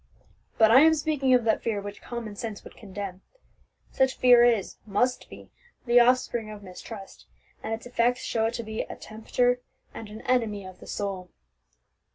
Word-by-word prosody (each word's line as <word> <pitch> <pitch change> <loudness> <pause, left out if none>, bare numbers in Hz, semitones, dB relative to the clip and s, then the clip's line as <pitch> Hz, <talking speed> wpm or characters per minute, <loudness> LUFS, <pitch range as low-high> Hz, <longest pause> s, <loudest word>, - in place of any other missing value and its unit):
But 220 -1 +6
I 255 - +9
am 320 +1 +6
speaking 295 -3 0
of 245 - +2
that 220 -1 +1
fear 220 -3 -1
which 205 0 -8
common 230 -4 -6
sense 215 -1 -6
would - - -13
condemn. 195 -2 -7 0.7
Such 265 0 +1
fear 245 -1 +7
is, 230 -5 +2
must 245 +5 0
be, - - -13 0.3
the 240 0 +5
offspring 240 -2 +2
of 210 -1 -9
mistrust, 195 +2 -10 0.3
and - - -5
its 225 +1 -4
effects 245 +1 +1
show 225 -1 0
it 230 - -4
to 235 - -4
be 220 0 -4
a - - -7
tempter 245 +3 -1 0.3
and 220 - -8
an 215 +1 -9
enemy 220 -6 0
of 185 -1 -11
the - - -13
soul." 195 -3 -4
225 Hz, 180 wpm, -26 LUFS, 205-245 Hz, 0.7 s, I